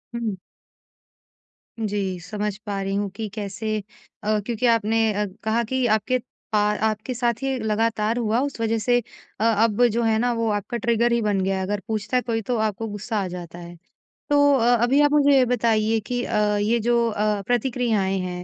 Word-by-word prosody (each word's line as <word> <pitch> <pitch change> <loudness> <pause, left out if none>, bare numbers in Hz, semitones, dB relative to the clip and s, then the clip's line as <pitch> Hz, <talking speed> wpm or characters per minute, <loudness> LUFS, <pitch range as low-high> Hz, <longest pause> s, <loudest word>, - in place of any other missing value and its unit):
हुँ। 225 -4 -2 1.4
जी, 200 -4 -2
समझ 205 +3 -4
पा 200 -1 -3
रही 195 0 -2
हूँ 200 0 -1
कि 220 0 -4
कैसे 215 +1 -3 0.5
अ, 215 0 +1
क्योंकि 240 +1 -2
आपने 225 -1 +2
अ, 210 +1 0 0.2
कहा 225 +2 +1
कि 260 +2 -1
आपके 220 +4 +2 0.3
पा 210 - +3 0.3
आपके 215 +4 -2
साथ 240 0 +1
ये 270 -1 0
लगातार 220 +1 0
हुआ 230 0 +1
उस 280 -4 -3
वजह 225 0 +1
से 245 +3 +2 0.4
अ, - - 0
अब 225 +1 +3
जो 235 +1 0
है 220 -1 +2
ना 245 +1 +1
वो 230 -1 0
आपका 205 +3 -2
ट्रिगर 235 +1 +1
ही 235 0 +2
बन 205 -2 +1
गया 190 0 0
है। 190 - -2
अगर 205 +1 -2
पूछता 220 +3 -1
है - - +2
कोई 225 -2 -2
तो 245 - +1
आपको 220 0 -1
गुस्सा 215 +2 -4
आ - - -3
जाता 175 -1 -8
है, 175 0 -10 0.5
तो 285 0 +5
अ, 245 -2 +4
अभी 270 +4 +4
आप 290 0 +4
मुझे 285 -2 +5
ये 255 - +5
बताइए 225 -2 +1
कि 245 0 -1
अ, - - -1 0.2
ये 230 +3 +2
जो 235 +1 +2
अ, 210 -1 0
प्रतिक्रियाएँ 230 -5 0
हैं 180 -1 -4
220 Hz, 195 wpm, -23 LUFS, 205-240 Hz, 1.4 s, तो